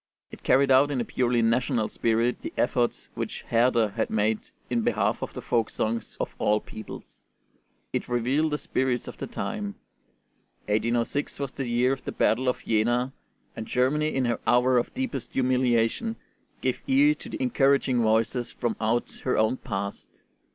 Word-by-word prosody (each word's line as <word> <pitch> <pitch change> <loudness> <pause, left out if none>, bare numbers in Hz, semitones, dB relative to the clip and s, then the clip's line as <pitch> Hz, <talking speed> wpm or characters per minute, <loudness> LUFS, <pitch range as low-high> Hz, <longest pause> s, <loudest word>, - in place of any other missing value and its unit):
It - - -11
carried 135 +1 +4
out 135 +2 +6
in 140 -3 -1
a 120 - -1
purely 120 -1 +1
national 115 -1 +1
spirit 115 +1 0
the - - -5
efforts 120 -1 0
which - - -5
Herder 115 -1 +3
had - - -2
made 110 0 0 0.2
in 120 -1 0
behalf - - +1
of - - -5
the - - -6
folk 115 -2 +1
songs 115 +1 -3
of - - -3
all 105 +1 +3
peoples. 110 0 -11 0.7
It - - -2
revealed 130 +6 +1
the 150 - 0
spirit 130 -4 -1
of - - -9
the - - -4
time. 210 -3 -4 0.9
1806 115 +7 0
was 140 -2 -3
the 135 - -4
year 120 +2 +2
of 135 - -7
the - - -4
battle 125 +4 +2
of 125 - -3
Jena, 120 +4 +1 0.4
and 110 - -6
Germany 150 +5 +1
in 130 -1 +1
her 120 -2 0
hour 125 +1 +4
of 120 - -3
deepest 260 -1 -3
humiliation 130 - +1 0.5
gave - - -1
ear 280 +3 +5
to - - -11
the 320 - -5
encouraging 140 - +2
voices 115 +2 +1
from 120 -3 -2
out 115 +2 -1
her 130 - +1
own 110 +4 +2
past. 100 -4 -6
125 Hz, 170 wpm, -26 LUFS, 115-135 Hz, 0.9 s, out